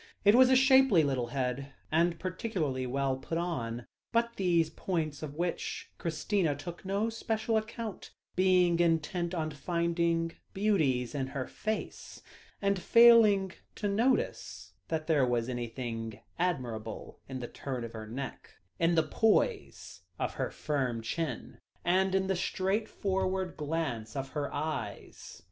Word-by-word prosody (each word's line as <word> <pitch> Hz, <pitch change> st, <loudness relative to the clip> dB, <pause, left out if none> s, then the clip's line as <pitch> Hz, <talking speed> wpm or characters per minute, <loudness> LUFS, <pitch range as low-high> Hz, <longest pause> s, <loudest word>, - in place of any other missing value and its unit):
It 205 Hz, -, +8 dB
was 255 Hz, +2 st, +7 dB
a 260 Hz, -, +6 dB
shapely 265 Hz, -, +6 dB
little 130 Hz, -4 st, 0 dB
head, 135 Hz, +2 st, -3 dB, 0.2 s
and 170 Hz, +1 st, +3 dB
particularly 165 Hz, -, -2 dB
well 135 Hz, +1 st, 0 dB
put 165 Hz, +5 st, -4 dB
on, 120 Hz, -9 st, -3 dB, 0.3 s
but 235 Hz, 0 st, +2 dB
these 170 Hz, -4 st, +2 dB
were -, -, -28 dB
points 155 Hz, -6 st, -2 dB
of 150 Hz, -2 st, -6 dB
which 175 Hz, +1 st, -3 dB
Christina 165 Hz, 0 st, 0 dB
took 170 Hz, +5 st, -8 dB
no 200 Hz, +4 st, 0 dB
special 225 Hz, 0 st, -1 dB
account, 220 Hz, -1 st, -3 dB, 0.3 s
being 180 Hz, -2 st, +4 dB
intent 170 Hz, +1 st, +1 dB
on 155 Hz, -2 st, -1 dB
finding 170 Hz, +1 st, 0 dB, 0.2 s
beauties 155 Hz, -, +1 dB
in 135 Hz, -2 st, -2 dB
her 135 Hz, -1 st, -4 dB
face, 215 Hz, 0 st, -5 dB, 0.4 s
and 200 Hz, -2 st, +1 dB
failing 225 Hz, -5 st, +6 dB, 0.2 s
to 210 Hz, -, -2 dB
notice 100 Hz, -, 0 dB
that 155 Hz, -1 st, -2 dB
there 155 Hz, -4 st, +3 dB
was 120 Hz, -1 st, 0 dB
anything 120 Hz, -2 st, -4 dB, 0.2 s
admirable 125 Hz, -11 st, -3 dB
in 130 Hz, -1 st, -4 dB
the 120 Hz, -, -5 dB
turn 130 Hz, -2 st, -5 dB
of 115 Hz, -, -7 dB
her 110 Hz, -1 st, -7 dB
neck, 135 Hz, +5 st, -7 dB, 0.2 s
in 170 Hz, +1 st, +3 dB
the 160 Hz, -, +4 dB
poise 230 Hz, -, 0 dB, 0.2 s
of -, -, -2 dB
her -, -, -2 dB
firm 130 Hz, -6 st, -2 dB
chin, 160 Hz, +7 st, -4 dB, 0.3 s
and 190 Hz, +2 st, +3 dB
in 190 Hz, 0 st, +2 dB
the 190 Hz, 0 st, 0 dB
straightforward 190 Hz, -1 st, -1 dB
glance 145 Hz, -8 st, -3 dB
of 135 Hz, -1 st, -3 dB
her 145 Hz, 0 st, -3 dB
eyes. 155 Hz, +2 st, -5 dB
165 Hz, 140 wpm, -31 LUFS, 135-190 Hz, 0.4 s, It